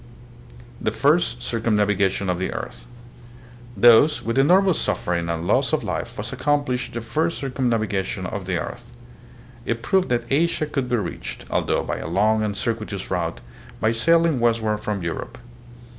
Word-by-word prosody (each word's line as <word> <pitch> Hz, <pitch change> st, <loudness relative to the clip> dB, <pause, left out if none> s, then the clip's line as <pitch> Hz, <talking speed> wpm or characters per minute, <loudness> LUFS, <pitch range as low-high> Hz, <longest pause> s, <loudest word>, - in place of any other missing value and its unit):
The -, -, 0 dB
First 155 Hz, +5 st, +2 dB
Circumnavigation 105 Hz, -4 st, +1 dB
of 90 Hz, -1 st, 0 dB
the 95 Hz, -, -2 dB
Earth. -, -, -7 dB, 0.9 s
Thus 120 Hz, +8 st, +6 dB
with 115 Hz, +3 st, 0 dB
enormous 185 Hz, +5 st, +4 dB
suffering 85 Hz, -1 st, -1 dB
and 85 Hz, 0 st, -2 dB
loss -, -, +2 dB
of -, -, +1 dB
life -, -, -4 dB
was -, -, -5 dB
accomplished 145 Hz, -4 st, 0 dB
the 115 Hz, -, -3 dB
first 160 Hz, +8 st, -1 dB
circumnavigation 115 Hz, -8 st, -1 dB
of 95 Hz, +1 st, -5 dB
the 95 Hz, -2 st, 0 dB
earth. 120 Hz, +6 st, -7 dB, 0.7 s
It 115 Hz, 0 st, -3 dB
proved 190 Hz, -2 st, +2 dB
that 120 Hz, -1 st, 0 dB
Asia 155 Hz, +2 st, +2 dB
could 135 Hz, -4 st, -3 dB
be 120 Hz, -, +2 dB
reached, 110 Hz, -, -5 dB
although -, -, +1 dB
by -, -, -3 dB
a -, -, -5 dB
long 105 Hz, +5 st, +2 dB
and 105 Hz, -2 st, -2 dB
circuitous 110 Hz, -4 st, -3 dB
route, 85 Hz, -7 st, -2 dB, 0.4 s
by 110 Hz, -, +2 dB
sailing 165 Hz, +4 st, +3 dB
westward 115 Hz, -2 st, +1 dB
from 105 Hz, -3 st, -3 dB
Europe. 85 Hz, -1 st, -5 dB
115 Hz, 155 wpm, -23 LUFS, 100-135 Hz, 0.9 s, Thus